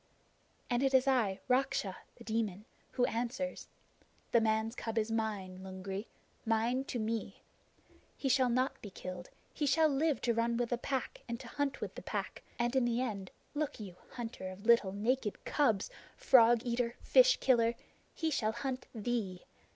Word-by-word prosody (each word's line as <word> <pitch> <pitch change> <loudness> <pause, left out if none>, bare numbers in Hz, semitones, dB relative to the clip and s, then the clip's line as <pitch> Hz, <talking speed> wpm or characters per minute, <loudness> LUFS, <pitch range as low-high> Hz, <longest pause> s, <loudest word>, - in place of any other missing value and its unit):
"And 240 0 +1
it 270 -1 +3
is 260 +1 +4
I, 230 -8 +2
Raksha 250 -7 +1 0.2
[The 235 - -13
Demon], 220 -3 -2 0.3
who 245 - +3
answers. 245 +4 -3 0.6
The 235 - +5
man's 220 0 +1
cub 225 -2 -4
is 220 0 +1
mine, 205 -5 -2
Lungri 190 +2 -5 0.4
mine 230 +4 +1
to 255 - -3
me! 220 -3 -3 0.7
He 275 - -2
shall 260 -1 +4
not 255 +3 0
be 205 - -7
killed. 180 -1 -7 0.2
He 295 - -1
shall 315 +3 +5
live 300 +1 +1
to 235 - +2
run 230 +1 +1
with 240 -1 0
the 240 - 0
Pack 265 -1 -3
and 235 0 -3
to - - -9
hunt 285 -2 -2
with - - -4
the - - -8
Pack; - - -4 0.2
and 240 +2 0
in 260 -2 +4
the 240 0 +1
end, 205 -7 -3 0.2
look 295 -4 -2
you, 195 -4 -8 0.2
hunter 225 -6 -5
of 190 +3 -10
little 230 -4 +5
naked 220 +2 -1
cubs 225 -10 +2 0.3
frog 235 -2 +6
eater 235 0 0
fish - - +6
killer 235 -2 +3 0.4
he 320 -1 -1
shall 220 -6 +1
hunt 255 +2 -4
thee! 215 -5 -2
235 Hz, 170 wpm, -33 LUFS, 215-255 Hz, 0.7 s, frog